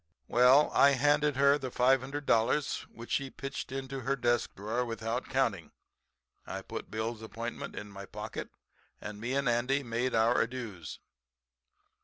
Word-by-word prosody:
"Well, 125 +5 +5
I 140 0 +6
handed 145 +2 +3
her 140 +2 +4
the 130 -2 -4
$500, 135 +1 +1
which 115 +1 -11
she 135 -1 0
pitched 135 0 -6
into 135 0 -4
her 135 +2 0
desk 120 -2 0
drawer 110 +5 -2
without 115 +1 -3
counting. 115 -11 0 0.7
I - - -6
put - - -7
Bill's 110 +1 -3
appointment 115 +2 -6
in 105 0 -7
my 100 0 -9
pocket 105 +1 -6 0.5
and 105 0 -7
me 125 +4 -2
and 140 -1 +1
Andy 125 +4 +1
made 120 +1 -1
our 115 +2 +4
adieus. 115 -9 -5
125 Hz, 145 wpm, -31 LUFS, 115-135 Hz, 0.7 s, I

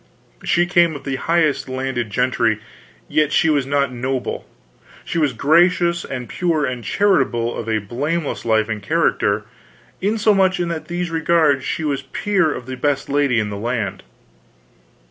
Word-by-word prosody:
"She 175 0 +2
came 175 -3 +3
of 145 - -8
the 135 -2 -2
highest 160 -4 +1
landed 130 -3 -2
gentry, 115 -1 +1 0.5
yet 150 -1 +1
she 160 -2 +3
was 140 -3 +1
not 140 -2 +1
noble; 130 +1 -3 0.6
she 170 - -2
was 150 -4 +2
gracious 170 +6 +3
and 125 -2 -6
pure 165 -5 0
and 125 -2 -4
charitable, 125 - +1
of 115 - -5
a 110 - +1
blameless 145 +10 -3
life 110 -2 +2
and 110 -2 -4
character, 105 -6 +1 0.6
insomuch 200 -2 +2
that 175 - 0
in 160 - -6
these 175 0 -3
regards 160 -4 +2
was 145 -3 0
she 140 - -13
peer 190 -6 +1
of 125 - -6
the 130 0 -6
best 140 +1 -1
lady 140 -4 +2
in 105 -1 -2
the 100 - -5
land." 110 -3 -2
140 Hz, 160 wpm, -20 LUFS, 120-170 Hz, 0.6 s, came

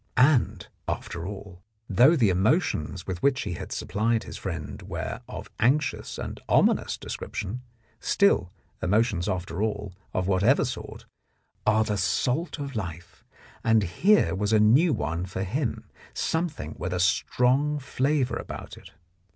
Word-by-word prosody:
And, 130 0 +4 0.2
after 85 0 -4
all, 95 -3 -8 0.3
though 125 - +6
the 115 - +4
emotions 95 - +1
with 90 -2 -4
which 140 -1 +2
he 100 - -3
had - - -7
supplied 115 +2 0
his - - -8
friend - - -5
were - - -5
of - - -8
anxious 135 +7 +1
and - - -5
ominous - - +3
description, 120 +7 -5 0.4
still, 200 - +2 0.3
emotions 105 -2 +1
after 90 0 -3
all, 105 -3 -2 0.2
of 95 0 -1
whatever 100 +8 +3
sort, 125 - -6 0.6
are 110 +1 +5
the 105 -1 -1
salt 125 - 0
of 140 -3 -5
life, 90 -4 -6 0.4
and 110 -1 +4
here 180 - +3
was 100 +2 -1
a 110 - +5
new 130 +11 +5
one 85 - -2
for 95 +1 -3
him, 120 +6 -2 0.3
something 160 - -2
with 90 +1 -3
a 90 - -1
strong 125 +10 +2
flavour 135 -1 0
about - - -7
it. - - -14
110 Hz, 145 wpm, -26 LUFS, 95-135 Hz, 0.6 s, though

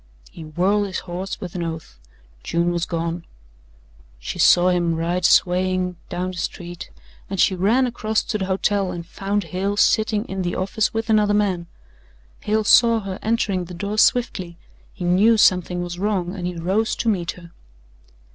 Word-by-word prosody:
He - - -11
whirled 190 +7 0
his 190 - -4
horse 185 +2 -6
with 180 -3 -7
an 180 - -4
oath 160 - -6 0.4
June 170 - 0
was 170 -1 -2
gone. 170 0 -3 0.9
She - - -6
saw 180 +1 +5
him 175 -2 +1
ride 170 +2 -1
swaying 185 0 +2
down 180 +1 -3
the 185 - -9
street 175 0 -6 0.4
and 195 -1 -4
she 190 - +4
ran 210 +8 +2
across 220 -3 -1
to 215 - -3
the 190 - -1
hotel 195 0 0
and 170 -2 -6
found 200 +3 -2
Hale 190 +5 -3
sitting 215 0 +2
in 190 0 -4
the 175 -1 -2
office 200 +3 0
with 225 0 -2
another 210 -1 +3
man. 190 -5 0 0.7
Hale 215 +1 0
saw 230 +1 +5
her 195 -2 -6
entering 205 -5 0
the 180 +1 -9
door 205 +4 -3
swiftly, 185 -10 +1 0.3
he - - -8
knew 205 +6 +4
something 180 -3 +3
was 175 0 -6
wrong 190 -3 -1
and 180 -2 -4
he 180 - -4
rose 190 +7 0
to - - -3
meet 185 -6 0
her. 170 -2 -14
185 Hz, 175 wpm, -22 LUFS, 175-205 Hz, 0.9 s, saw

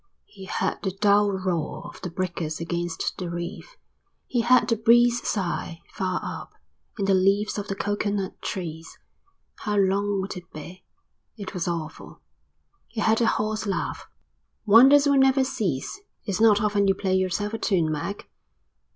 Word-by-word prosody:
He 195 -2 -12
heard - - -2
the 190 -1 -3
dull 205 0 +4
roar 185 -5 -3
of 175 - -11
the 180 - -4
breakers 170 -3 -3
against 170 0 -3
the 180 -2 -4
reef. 175 - -6 0.5
He 245 - 0
heard 240 -1 +4
the 230 - +2
breeze 240 +2 +4
sigh, 170 -4 -3
far 185 -2 -1
up, - - -7 0.4
in 200 - -1
the 195 - +3
leaves 195 +3 +2
of 205 - -5
the 195 - -3
coconut 205 -1 -2
trees. 165 -4 -6 0.6
How 210 -1 -3
long 200 +1 +1
would 190 +2 -4
it 180 -2 -10
be? 175 +5 -10 0.5
It 200 -2 -7
was 180 -3 -3
awful. 165 -2 -5 0.7
He 225 - -7
heard 220 +2 +2
a 230 - +3
hoarse 215 0 -1
laugh. 195 - -3 0.6
"Wonders 265 +7 +7
will 280 -1 +4
never 265 0 +4
cease. 215 - -3 0.2
It's 200 0 -2
not 210 -2 +5
often 205 -1 +2
you 195 - +3
play 190 -1 -1
yourself 190 +3 -1
a 225 - -3
tune, 170 -6 +1
Mac." 170 +7 -4
200 Hz, 160 wpm, -25 LUFS, 180-215 Hz, 0.7 s, Wonders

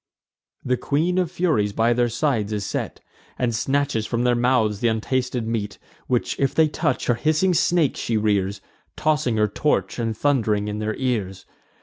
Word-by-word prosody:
The 125 0 +1
Queen 165 +8 0
of 180 -3 0
Furies 155 - 0
by 115 +3 +2
their 120 0 +1
sides 120 -4 0
is 105 -2 -2
set, - - -4 0.4
And 120 -2 0
snatches 135 -1 0
from 120 0 -1
their 125 0 +3
mouths 120 -4 +2
th' - - -1
untasted 125 +2 0
meat, 110 -3 -3 0.3
Which 125 -2 -1
if 135 -1 +1
they 160 -1 +5
touch, - - -1
her 120 - +3
hissing 155 +9 +1
snakes 170 -3 +2
she 115 - -1
rears, 100 -2 0 0.3
Tossing 150 -7 +1
her 105 0 +3
torch, 145 +5 -1
and 115 -2 -2
thund'ring 110 -8 +1
in 105 0 -3
their 110 0 -2
ears. 105 -8 -2
120 Hz, 175 wpm, -23 LUFS, 110-145 Hz, 0.4 s, they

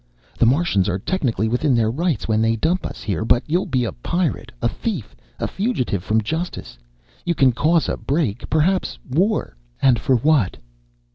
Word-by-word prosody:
The 120 - +5
Martians 130 - +2
are 90 - 0
technically 115 - -1
within 125 +4 +1
their 110 -2 +2
rights 160 - -1
when 110 -1 +2
they 115 0 +2
dump 165 +10 0
us - - -9
here, 100 -4 -1
but 120 +2 +3
you'll 175 +5 0
be 125 -2 0
a - - -2
pirate, 170 +5 -2
a 115 - +1
thief, 180 - -4 0.2
a - - -2
fugitive 190 - -1
from 110 +2 +1
justice. 160 - -4 0.4
You 170 - 0
can 135 -3 +4
cause 160 +6 +2
a - - -1
break, 135 -7 -2
perhaps 175 +5 +1
war. 190 - +1 0.2
And 130 -4 +4
for 135 -2 +2
what?" 130 -5 +2
130 Hz, 180 wpm, -21 LUFS, 110-170 Hz, 0.4 s, The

